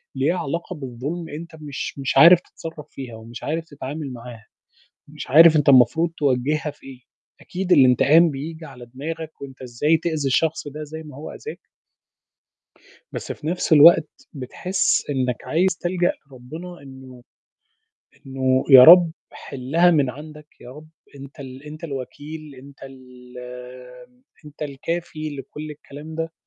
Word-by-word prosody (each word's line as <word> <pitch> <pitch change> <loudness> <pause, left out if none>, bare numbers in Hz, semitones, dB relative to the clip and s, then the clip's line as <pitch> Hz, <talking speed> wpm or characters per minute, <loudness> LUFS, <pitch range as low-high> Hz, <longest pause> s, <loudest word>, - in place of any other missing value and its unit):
ليها 150 +7 0
علاقة 170 +5 -4
بالظلم، 145 +5 -6
أنت 160 +2 -9
مش 145 -1 -6
مش 135 - -2
عارف 170 +1 +9
تتصرّف 160 -2 -10
فيها 125 -4 -9
ومش 115 +2 -11
عارف 160 +2 -3
تتعامل 145 -1 -7
معاها 115 -2 -11 0.6
مش 150 0 -9
عارف 160 +3 +8
أنت 150 -1 +3
المفروض 160 +6 +4
توجهّها 145 +2 0
في 140 - -18
إيه؟ 130 -2 -11 0.4
أكيد 185 0 -5
الانتقام 150 +3 +5
بييجي 160 +4 -7
على 125 -4 -12
دماغك 155 +6 -8
وأنت 135 -2 -10
إزاي 130 +6 +1
تؤذي 160 -4 -2
الشخص 155 +3 0
ده 150 +2 -7
زي 160 +2 -9
ما 150 -4 -12
هو 155 - -8
آذاك. 450 - -9 1.5
بس - - -5
في 155 - -11
نفس 175 0 -2
الوقت 155 0 +7 0.2
بتحس 155 +5 -1
إنك 130 -3 -2
عايز 180 +1 0
تلجأ 175 0 0
لربنا، 155 +7 -11
إنه 130 -2 -13 1.0
إنه 130 -1 0
يا 130 -1 +11
رب 170 -1 +8 0.2
حِلَّها 145 +5 0
من 145 -6 +2
عندك، 150 +2 -12
يا 125 - -11
رب 150 +3 -13 0.3
أنت 140 +1 -12
ال 130 0 -10
أنت 155 +2 -10
الوكيل 145 +1 -8
أنت 140 +2 -15
ال 125 -2 -14 1.1
أنت 150 0 -11
الكافي 155 +1 -5
لكُلّ 150 +3 -8
الكلام 150 +1 -11
ده، 165 0 -4
150 Hz, 145 wpm, -22 LUFS, 130-160 Hz, 1.5 s, يا